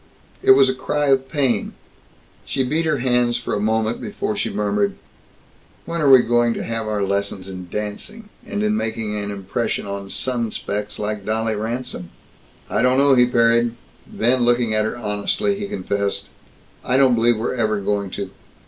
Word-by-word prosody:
It -, -, +7 dB
was 135 Hz, 0 st, +6 dB
a 130 Hz, -, +1 dB
cry 145 Hz, +2 st, -1 dB
of 135 Hz, -1 st, +2 dB
pain. 135 Hz, -9 st, 0 dB, 0.7 s
She 135 Hz, -, -1 dB
beat 155 Hz, +6 st, 0 dB
her 155 Hz, -2 st, +2 dB
hands 120 Hz, -1 st, +2 dB
for 120 Hz, -, -4 dB
a -, -, 0 dB
moment 110 Hz, +2 st, 0 dB
before -, -, -3 dB
she -, -, -1 dB
murmured, 100 Hz, -1 st, 0 dB, 0.9 s
"When 170 Hz, 0 st, -3 dB
are 145 Hz, -, +4 dB
we 130 Hz, -2 st, +8 dB
going 120 Hz, 0 st, +2 dB
to -, -, -4 dB
have 115 Hz, -1 st, -3 dB
our 105 Hz, -2 st, -1 dB
lessons 100 Hz, -1 st, -2 dB
in 90 Hz, -2 st, -8 dB
dancing 155 Hz, -, -6 dB
and 205 Hz, +1 st, -3 dB
in 215 Hz, 0 st, +2 dB
making 110 Hz, -, -2 dB
an 105 Hz, -1 st, -2 dB
impression 100 Hz, +4 st, -3 dB
on 100 Hz, -1 st, -5 dB
sun 120 Hz, -1 st, -1 dB
specks 105 Hz, 0 st, -4 dB
like 105 Hz, -1 st, -3 dB
Dolly 110 Hz, +1 st, 0 dB
Ransome?" 110 Hz, -4 st, -4 dB, 0.6 s
"I -, -, 0 dB
don't 125 Hz, +1 st, +3 dB
know," 140 Hz, 0 st, +5 dB
he 125 Hz, -1 st, +5 dB
parried. 115 Hz, -1 st, +3 dB, 0.4 s
Then, 120 Hz, +2 st, +2 dB
looking 120 Hz, -2 st, +2 dB
at 110 Hz, 0 st, +2 dB
her 110 Hz, -, -3 dB
honestly, 110 Hz, -, 0 dB
he 205 Hz, -, -3 dB
confessed, 100 Hz, -, -2 dB, 0.5 s
"I 125 Hz, -, +1 dB
don't 135 Hz, -2 st, +5 dB
believe 120 Hz, 0 st, +3 dB
we're 110 Hz, -, -2 dB
ever 110 Hz, -4 st, 0 dB
going 100 Hz, 0 st, -1 dB
to. -, -, -4 dB
115 Hz, 180 wpm, -21 LUFS, 105-130 Hz, 0.9 s, we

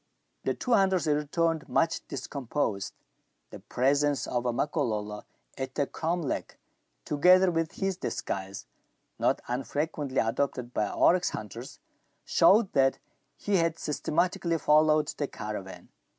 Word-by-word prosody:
The -, -, 0 dB
two 250 Hz, -, -4 dB
hunters 190 Hz, -6 st, +3 dB
returned, 155 Hz, +2 st, 0 dB
much 165 Hz, 0 st, 0 dB
discomposed. 120 Hz, -7 st, -3 dB, 0.6 s
The -, -, -9 dB
presence 140 Hz, +2 st, +1 dB
of 120 Hz, 0 st, -2 dB
a -, -, +2 dB
Makololo 110 Hz, -7 st, -2 dB, 0.3 s
at 130 Hz, 0 st, -4 dB
the 145 Hz, -, +1 dB
cromlech, 165 Hz, 0 st, -3 dB, 0.5 s
together 180 Hz, +5 st, +5 dB
with 165 Hz, -1 st, -1 dB
his 195 Hz, -2 st, -2 dB
disguise, 95 Hz, -, -4 dB, 0.5 s
not -, -, +1 dB
unfrequently 140 Hz, +2 st, -3 dB
adopted 125 Hz, +1 st, -1 dB
by 105 Hz, -, 0 dB
oryx 180 Hz, 0 st, +3 dB
hunters, 110 Hz, +4 st, -7 dB, 0.5 s
showed 205 Hz, 0 st, +4 dB
that 135 Hz, -1 st, +3 dB, 0.4 s
he 205 Hz, -1 st, +1 dB
had 165 Hz, -1 st, +1 dB
systematically 170 Hz, +2 st, 0 dB
followed 155 Hz, 0 st, +4 dB
the 145 Hz, -, -3 dB
caravan. 105 Hz, -5 st, -7 dB
145 Hz, 120 wpm, -28 LUFS, 125-165 Hz, 0.6 s, together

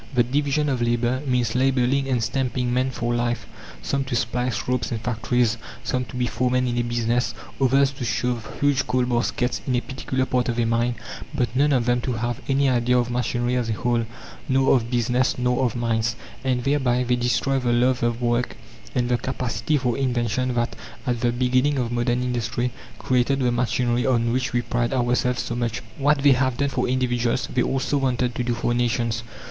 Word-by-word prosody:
The 120 Hz, -, +5 dB
division 145 Hz, +4 st, 0 dB
of 130 Hz, -4 st, 0 dB
labour 120 Hz, +2 st, +1 dB
means 125 Hz, -3 st, +1 dB
labelling 130 Hz, +1 st, +2 dB
and 125 Hz, -3 st, +1 dB
stamping 125 Hz, +1 st, -1 dB
men 130 Hz, +1 st, +1 dB
for 120 Hz, -2 st, -2 dB
life 120 Hz, -1 st, -1 dB, 0.4 s
some 140 Hz, 0 st, 0 dB
to 130 Hz, -, -2 dB
splice 125 Hz, +1 st, -1 dB
ropes 125 Hz, 0 st, -1 dB
in 115 Hz, -, -1 dB
factories, 115 Hz, 0 st, 0 dB, 0.2 s
some 125 Hz, 0 st, -1 dB
to 125 Hz, -, -11 dB
be 125 Hz, 0 st, 0 dB
foremen 125 Hz, +1 st, +1 dB
in 120 Hz, -, -1 dB
a -, -, +1 dB
business, 120 Hz, +1 st, 0 dB, 0.3 s
others 135 Hz, +1 st, +4 dB
to 135 Hz, -2 st, -7 dB
shove 115 Hz, 0 st, -1 dB
huge 145 Hz, -1 st, +2 dB
coal 125 Hz, 0 st, +1 dB
baskets 125 Hz, 0 st, 0 dB
in 130 Hz, -, +1 dB
a -, -, +3 dB
particular 130 Hz, -1 st, -2 dB
part 125 Hz, -1 st, 0 dB
of 120 Hz, -, -1 dB
a 115 Hz, -, +2 dB
mine; 120 Hz, +1 st, +1 dB, 0.4 s
but 120 Hz, 0 st, -1 dB
none 145 Hz, +3 st, +3 dB
of 125 Hz, -4 st, +2 dB
them 120 Hz, 0 st, +2 dB
to 125 Hz, -, -2 dB
have 120 Hz, +2 st, -2 dB
any 135 Hz, +1 st, +3 dB
idea 125 Hz, -1 st, +2 dB
of 120 Hz, 0 st, 0 dB
machinery 120 Hz, 0 st, 0 dB
as 120 Hz, -2 st, -1 dB
a -, -, +1 dB
whole, 120 Hz, 0 st, 0 dB, 0.4 s
nor 135 Hz, 0 st, +4 dB
of 115 Hz, -2 st, 0 dB
business, 120 Hz, +1 st, +1 dB
nor 125 Hz, +1 st, +1 dB
of 120 Hz, -2 st, 0 dB
mines. 115 Hz, -1 st, 0 dB, 0.3 s
And 125 Hz, -2 st, 0 dB
thereby 130 Hz, -3 st, +2 dB
they 125 Hz, 0 st, +1 dB
destroy 125 Hz, +3 st, +1 dB
the 125 Hz, -2 st, 0 dB
love 125 Hz, +1 st, +2 dB
of 120 Hz, +1 st, 0 dB
work 120 Hz, +1 st, 0 dB, 0.4 s
and 125 Hz, -1 st, +1 dB
the 120 Hz, -1 st, +1 dB
capacity 130 Hz, +3 st, -1 dB
for 125 Hz, -3 st, 0 dB
invention 125 Hz, -1 st, 0 dB
that, 120 Hz, 0 st, -1 dB, 0.3 s
at 120 Hz, -2 st, 0 dB
the 120 Hz, -, +2 dB
beginning 130 Hz, +3 st, +2 dB
of 120 Hz, -2 st, -1 dB
modern 120 Hz, +1 st, 0 dB
industry, 120 Hz, 0 st, -1 dB, 0.3 s
created 130 Hz, +2 st, +1 dB
the 125 Hz, -2 st, +1 dB
machinery 120 Hz, 0 st, +1 dB
on 120 Hz, -2 st, +2 dB
which 130 Hz, +2 st, 0 dB
we 120 Hz, 0 st, 0 dB
pride 120 Hz, +1 st, -1 dB
ourselves 125 Hz, 0 st, +1 dB
so 120 Hz, -, -4 dB
much. 120 Hz, -1 st, -2 dB, 0.2 s
What 145 Hz, 0 st, +2 dB
they 145 Hz, -, +7 dB
have 130 Hz, -1 st, +2 dB
done 140 Hz, 0 st, +1 dB
for 125 Hz, -2 st, -1 dB
individuals, 125 Hz, -1 st, 0 dB
they 125 Hz, -, +2 dB
also 135 Hz, +3 st, 0 dB
wanted 125 Hz, -2 st, 0 dB
to 125 Hz, -, -2 dB
do 120 Hz, 0 st, -1 dB
for 120 Hz, +1 st, 0 dB
nations. 120 Hz, -1 st, 0 dB
125 Hz, 200 wpm, -23 LUFS, 120-130 Hz, 0.4 s, they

